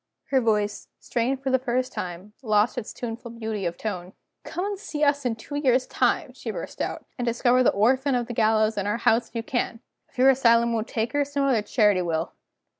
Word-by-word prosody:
Her 265 -2 +4
voice, 210 -3 0
strained 255 +3 -1
for 265 - 0
the 260 - +3
first 255 0 -1
time, 180 +3 -6
lost 215 -2 +2
its 240 -4 -5
tuneful 235 0 -6
beauty 220 -4 -3
of 170 0 -5
tone. 185 -3 -5 0.3
"Come 360 - -4
and 405 -1 -3
see 300 -7 -3
us 285 -1 +2
in 235 -2 0
two 225 +6 -11
years' 260 -3 +2
time," - - 0
she - - -7
burst - - -6
out - - -3
"and 245 - -1
discover 245 +2 +3
the 255 - +5
orphan 260 +6 +2
of 240 -1 0
the 240 - -6
gallows 220 -1 +2
in 200 - -2
our 210 +2 0
house 230 0 +2
if - - -33
you 230 - -2
can! 240 -2 -2 0.3
If - - -27
your 265 +2 +7
Asylum 235 -2 +4
won't 225 -1 -1
take 225 0 -2
her, 290 0 +2
some 285 0 -2
other 260 -6 +3
Charity 210 -3 +3
will. 165 -1 -2
235 Hz, 220 wpm, -25 LUFS, 215-260 Hz, 0.3 s, your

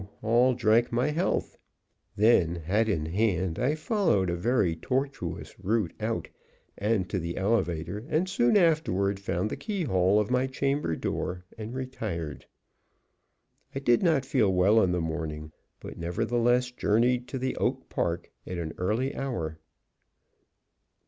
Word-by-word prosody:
all 120 +3 +4
drank 115 0 +3
my 125 +5 +1
health. 170 +5 -1 0.6
Then, 100 -6 +4
hat 100 +7 0
in 80 -7 0
hand, 90 -1 0
I 135 +5 +1
followed 155 - +1
a - - -1
very 95 -3 +1
tortuous 130 - -3
route 105 -3 0
out - - -2 0.5
and 105 -3 0
to 95 - 0
the 85 0 -4
elevator, 95 -2 -1
and 170 +4 +1
soon 185 -4 +3
afterward 125 - +2
found 100 +1 -2
the - - -2
keyhole 105 - +1
of 105 +2 -1
my 125 +1 +2
chamber 135 - -1
door, 90 +2 -3
and 110 +2 -7
retired. 110 - -5 1.3
I - - -1
did 120 -3 +3
not 160 -7 +2
feel 115 -7 +2
well 95 +5 +4
in 95 - +2
the 90 -1 0
morning, 80 -1 -4 0.3
but - - -9
nevertheless 120 +8 +1
journeyed 120 +2 +1
to 130 -1 -2
Oak - - -1
Park - - -2 0.2
at 90 - -4
an 80 -2 -4
early 110 +9 0
hour. 85 - -3
110 Hz, 140 wpm, -28 LUFS, 90-130 Hz, 1.3 s, all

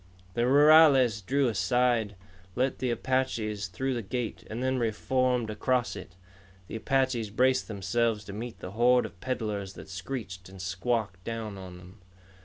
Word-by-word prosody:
The 120 +4 +1
rurales 140 -5 +6
drew 135 +5 +1
aside, 115 +1 +1 0.4
let 130 +2 0
the 130 - -1
Apaches 115 -5 -1
through 130 +9 -2
the 120 - -2
gate, 120 +2 -4
and 115 +4 -4
then 130 0 +1
reformed 125 +1 0
across 125 +3 0
it. 90 - -10 0.5
The 110 - -6
Apaches 130 -3 0
braced 130 +4 +2
themselves 105 +2 0
to 100 - -9
meet 115 +3 -7
the 90 - -6
horde 125 +3 +4
of 95 - -11
peddlers 105 -6 -3
that - - -11
screeched 95 -1 -6
and 95 0 -12
squawked 95 +1 -2
down 110 -2 -5
on 90 -1 -9
them. 90 +3 -15
115 Hz, 155 wpm, -28 LUFS, 100-130 Hz, 0.5 s, rurales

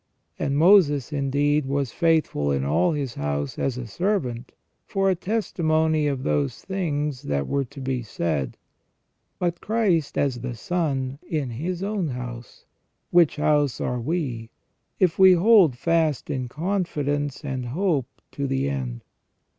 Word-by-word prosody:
And 140 0 0
Moses, 155 - +5
indeed, 145 +1 +1
was 140 -3 -1
faithful 160 - +1
in 70 -1 0
all 80 - +2
his 140 -5 -3
house 70 - -3
as 130 -2 -1
a 125 - -5
servant, 130 - -2 0.3
for 195 -1 +1
a - - +1
testimony 160 -6 0
of 135 -2 -2
those 75 -2 -1
things 150 -8 -2
that 70 -1 -2
were 140 -1 0
to 130 - -12
be 130 -1 -2
said: 80 - -2 0.8
but 175 -1 -2
Christ 200 -9 +1
as 130 -4 +1
the 125 -1 -4
Son 140 -2 -2
in 145 -6 -2
His 170 +9 -3
own 200 -4 -1
house: 125 -2 -7 0.5
which 170 -3 +5
house 145 -3 +1
are 125 -1 -2
we, 125 -6 -3 0.5
if 180 -2 +2
we 190 -1 +9
hold 180 - +5
fast 160 -1 +1
in 130 -2 -2
confidence 145 -3 -2
and 130 -3 -3
hope 150 -2 0 0.2
to 140 -1 -3
the 135 - 0
end." 60 -3 -4
145 Hz, 145 wpm, -24 LUFS, 125-170 Hz, 0.8 s, we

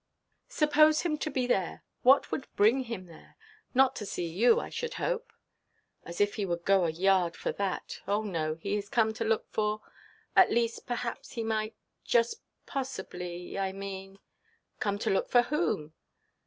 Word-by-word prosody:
"Suppose 305 0 +4
him 335 -3 0
to 310 - -2
be 260 -4 0
there. 195 -8 0 0.2
What 265 +3 +5
would 270 - -3
bring 235 +6 +4
him 225 -6 -5
there? 165 -2 -16 0.4
Not 265 0 +5
to 210 - -4
see 175 - -3
you, 215 - +4
I - - -5
should 475 0 -4
hope?" - - -2 0.7
"As 170 - -7
if 205 0 +3
he 205 - 0
would 170 -1 -3
go 195 -2 +4
a - - +1
yard 180 +1 +2
for - - -2
that! 200 -2 -3
Oh 205 +2 +1
no, 160 -6 -2
he 200 +5 -3
is 200 -1 -5
come 220 -1 +2
to 225 - -3
look 225 0 0
for—at 215 - 0
least, 230 0 0
perhaps 245 -1 -4
he 230 - -3
might, 220 0 -1 0.3
just 235 - +2 0.2
possibly, 180 -9 -5
I 190 -1 -1
mean——" 195 -1 -6 0.7
"Come 205 -1 0
to - - -1
look 195 - +1
for 245 -1 +5
whom?" 240 - -1
215 Hz, 170 wpm, -30 LUFS, 190-250 Hz, 0.7 s, What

